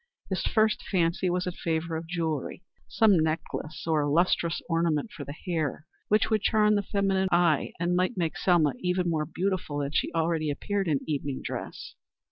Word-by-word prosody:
His 190 - 0
first 215 -1 +2
fancy 180 0 +1
was 180 +1 0
in 180 - -3
favor 165 -1 -2
of 160 +1 -5
jewelry 165 -1 -3 0.2
some 210 -6 +4
necklace 155 -1 -3
or 155 -3 +1
lustrous 170 +1 +2
ornament 165 +3 0
for 150 - -7
the 140 +1 -8
hair, 155 -4 -2 0.2
which 215 +2 +2
would 215 -2 +3
charm 210 -1 +3
the 205 - +2
feminine 195 -1 0
eye 175 -4 +2
and 175 +1 +1
might 185 +5 0
make 165 -3 -1
Selma 165 -6 +3
even 180 0 0
more 155 -3 0
beautiful 180 -4 -2
than 140 -1 -2
she - - 0
already 160 -1 +1
appeared 195 +7 -2
in 150 -4 +1
evening 140 -3 -2
dress. - - -6
170 Hz, 175 wpm, -27 LUFS, 155-185 Hz, 0.2 s, some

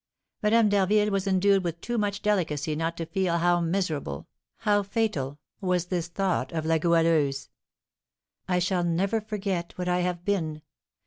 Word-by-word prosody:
Madame 220 +1 +4
d'Harville 205 +1 +3
was 195 0 -1
endued 195 0 +3
with 170 -1 -3
too 240 +7 -4
much 205 -2 -1
delicacy 155 -8 0
not 165 +2 -2
to 165 - -3
feel 185 -1 0
how 175 +1 +3
miserable, 165 - -2 0.3
how 205 -1 +3
fatal, 195 - -2 0.2
was 180 -3 0
this 175 -2 -2
thought 185 +1 -1
of 160 -1 -2
La 160 0 +2
Goualeuse: 160 -4 +2 1.0
"I 180 - +1
shall 180 0 +1
never 190 +6 +1
forget 195 -5 -3
what 180 0 -3
I 180 0 +2
have 180 -1 -2
been!" 160 -7 -1
180 Hz, 155 wpm, -27 LUFS, 165-200 Hz, 1.0 s, Madame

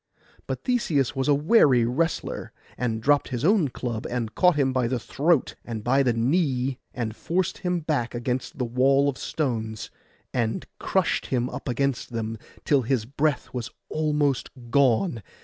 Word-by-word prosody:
But - - -4
Theseus 160 - +1
was 135 +1 -1
a 145 - +5
wary 145 - +5
wrestler, 160 +8 -1 0.2
and 115 -2 -2
dropt 145 +2 +3
his 125 +2 -3
own 195 -4 +4
club, 120 -3 -4
and 115 -3 -3
caught 180 -3 +4
him 135 -3 +2
by 130 -2 +1
the 125 +1 0
throat 145 +5 +1
and 110 -3 -5
by 135 +4 +3
the 130 -3 +3
knee, 130 +1 +1
and 115 -3 -4
forced 175 +6 -1
him 180 -2 -1
back 145 -7 -1
against 125 +6 -3
the 125 - -1
wall 135 +4 +3
of 140 - -2
stones, 110 -7 -3 0.4
and 115 -3 -1
crushed - - 0
him 125 -1 -1
up - - -5
against 130 0 -1
them, 115 -1 -3 0.3
till 140 -3 +4
his 120 -2 0
breath 140 +4 -1
was 125 0 -4 0.2
almost 150 -4 +1 0.2
gone. 135 - +3
130 Hz, 165 wpm, -25 LUFS, 120-150 Hz, 0.4 s, a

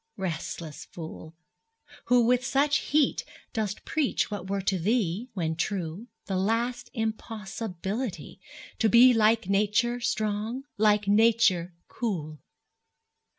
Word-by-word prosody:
Restless 165 -4 -5
fool, 160 -1 -9 0.7
Who 245 -1 +4
with 250 +1 +3
such 280 +4 +2
heat 295 -1 +1 0.3
dost 215 -2 -3
preach 300 -8 0
what 190 -2 -5
were 195 -1 -1
to 190 -1 0
thee, 210 +3 0
When 160 -4 -1
true, 180 +3 -3 0.2
the 190 -2 -2
last 230 +5 -1
impossibility 220 -1 -4 0.4
To 225 - +3
be 245 +3 +7
like 220 -2 +3
Nature 210 +5 +2
strong, 215 +2 -2
like 210 -1 +3
Nature 205 -5 +3
cool! 155 -10 -4
210 Hz, 110 wpm, -27 LUFS, 185-235 Hz, 0.7 s, be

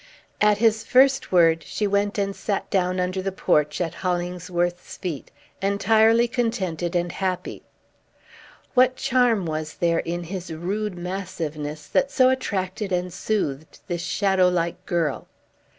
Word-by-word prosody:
At 210 -1 +5
his 225 0 +2
first 265 +3 +3
word, 165 -2 +4
she 160 +7 -3
went 205 +1 0
and 200 -1 -1
sat 200 -2 -2
down 185 -1 +1
under 185 +1 -1
the 195 +1 -2
porch, 150 -5 +1
at 170 -3 -1
Hollingsworth's 175 -1 -2
feet, 170 -7 -5 0.3
entirely 220 +4 +4
contented 190 - -2
and 175 0 0
happy. 185 -1 -3 1.1
What 255 0 +4
charm 245 -7 +2
was 155 -1 -4
there 170 -1 +1
in 175 +1 -3
his 180 0 -6
rude 190 +4 -3
massiveness 160 -5 -5
that 275 - +1
so 255 -2 +4
attracted 200 -6 -2
and 180 -1 -1
soothed 160 -8 -2
this 175 -3 -3
shadow 190 -1 +2
like 175 0 -2
girl? 165 -6 -1
185 Hz, 135 wpm, -24 LUFS, 175-210 Hz, 1.1 s, At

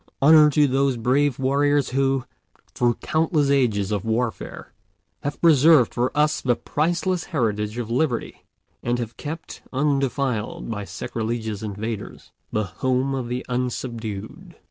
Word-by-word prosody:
Honor 150 +1 +7
to 150 0 +4
those 135 -1 +1
brave 130 +3 +2
warriors 140 +1 +2
who, 135 -1 +1 0.5
through 120 -1 +2
countless 155 -2 +1
ages 110 -8 +1
of 100 -2 -1
warfare, 115 +1 -3 0.5
have 145 - -4
preserved 155 -5 +6
for 125 +1 0
us 150 +1 +2
the 125 -2 +2
priceless 175 +6 -1
heritage 105 - -1
of 115 -2 -4
liberty, 125 -1 -1 0.4
and 120 +1 0
have 115 -1 -5
kept 160 +3 -7
undefiled 135 -5 -1
by 105 -2 -4
sacrilegious 110 0 -4
invaders 105 0 -6 0.2
the 110 - 0
home 130 +6 -1
of 130 -3 -3
the 125 +1 -4
unsubdued. 120 -4 -4
125 Hz, 130 wpm, -23 LUFS, 115-145 Hz, 0.5 s, Honor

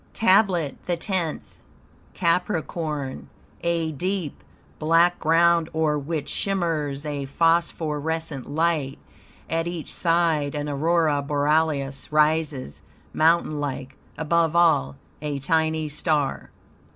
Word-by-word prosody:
TABLET 190 - +2
THE 175 -1 -1
TENTH 170 -2 -3 0.5
Capricorn 165 -5 -2 0.3
A 170 -2 0
deep, 180 +1 -3 0.4
black 165 +3 +3
ground, 165 +1 +3
o'er 155 -1 +2
which 150 0 -4
shimmers 160 -7 -1
a 145 -2 -3
phosphorescent 160 -1 0
light; 155 -3 0 0.5
at 165 +1 -1
each 170 -3 -5
side 165 -4 +1
an 145 0 -3
aurora 155 0 +1
borealis 145 -1 0
rises, 150 - +1 0.3
mountain 160 -1 +2
like; 135 -2 -4 0.2
above 165 +1 +1
all, 160 - +3 0.3
a 150 -2 -3
tiny 160 +2 0
star. 150 -1 -1
160 Hz, 100 wpm, -24 LUFS, 145-170 Hz, 0.5 s, black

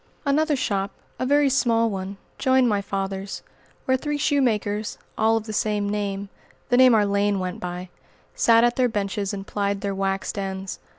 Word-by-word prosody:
Another 300 +2 +2
shop 200 -6 -1 0.3
a 255 - -1
very 290 +1 +4
small 235 -4 +2
one 195 -1 -4 0.2
joined 260 -1 +4
my 205 -3 +1
father's, 195 0 -4 0.4
where 260 - +3
three 295 +3 -2
shoemakers, 220 -8 0 0.2
all 220 +1 +3
of 225 - -3
the 215 0 -6
same 210 -1 0
name 200 -1 -3 0.4
the 245 - +4
name 255 -2 +7
our 210 -1 +4
lane 200 0 +1
went 185 -1 -3
by 180 0 -5 0.4
sat 230 0 +5
at 240 0 +2
their 250 -1 +3
benches 200 -1 -2
and 195 -1 -5
plied 200 -1 -2
their 200 -1 -2
"waxed 195 +1 -2
ends." 190 -1 -4
205 Hz, 175 wpm, -24 LUFS, 195-245 Hz, 0.4 s, name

